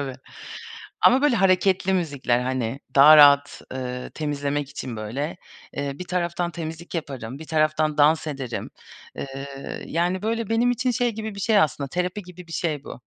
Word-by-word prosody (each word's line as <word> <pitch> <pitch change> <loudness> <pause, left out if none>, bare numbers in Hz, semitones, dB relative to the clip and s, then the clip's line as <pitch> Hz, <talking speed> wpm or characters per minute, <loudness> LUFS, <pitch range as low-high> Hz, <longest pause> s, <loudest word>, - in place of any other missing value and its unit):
Tabii. 135 -2 -4 0.9
Ama 260 +2 +6
böyle 290 -5 +3
hareketli 190 -1 +2
müzikler, 140 -9 0
hani, 130 0 -2 0.2
daha 150 +3 +9
rahat, 145 -1 +6
ııı, 125 -1 -5
temizlemek 145 -2 -2
için 125 -4 -6
böyle, 135 +11 -4 0.4
ııı, 140 +1 -3
bir 180 - -5
taraftan 175 -1 -1
temizlik 165 +1 -7
yaparım, 135 -5 -5
bir 160 - -10
taraftan 155 -1 +1
dans 155 +2 +4
ederim. 135 -6 -5 0.5
Iıı, 135 0 -7
yani, 175 +3 0
böyle 225 0 -2
benim 235 +2 +3
için 250 +1 0
şey 245 -1 0
gibi 220 -1 -6
bir - - -7
şey 215 +2 +2
aslında 140 -4 0
terapi 180 +6 -2
gibi 180 -1 -12
bir 165 - -9
şey 150 -5 -2
bu. - - -10
155 Hz, 165 wpm, -24 LUFS, 140-185 Hz, 0.9 s, daha